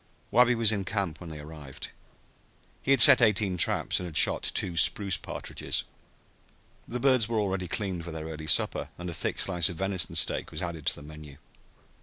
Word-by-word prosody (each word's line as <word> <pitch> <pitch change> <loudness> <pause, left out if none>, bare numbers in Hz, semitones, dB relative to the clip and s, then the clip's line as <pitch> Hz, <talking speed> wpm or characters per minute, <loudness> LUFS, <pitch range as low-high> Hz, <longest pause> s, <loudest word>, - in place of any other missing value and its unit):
Wabi 125 0 +4
was 115 -2 +4
in 100 -3 -2
camp 95 -4 -4
when 85 - -9
they 80 - -9
arrived. 75 -2 -10 0.9
He - - -7
had 135 - +4
set 135 -4 +9
eighteen 105 -4 +2
traps 85 - +2
and 90 - -6
had 80 - -4
shot - - +3
two 90 - -2
spruce 95 +3 +2
partridges. - - -4 1.0
The 125 - -4
birds 130 -4 +2
were 115 - -1
already 95 -3 -2
cleaned 95 -3 -4
for 85 - -8
their 80 -1 -7
early 80 -1 -8
supper, 75 - +1
and 90 0 -6
a - - -6
thick 80 - -1
slice 85 -2 +2
of 85 - -7
venison 95 -2 -2
steak - - -1
was - - -5
added 85 -4 -6
to - - +2
the 75 - -12
menu. 75 -2 -12
90 Hz, 195 wpm, -27 LUFS, 80-105 Hz, 1.0 s, set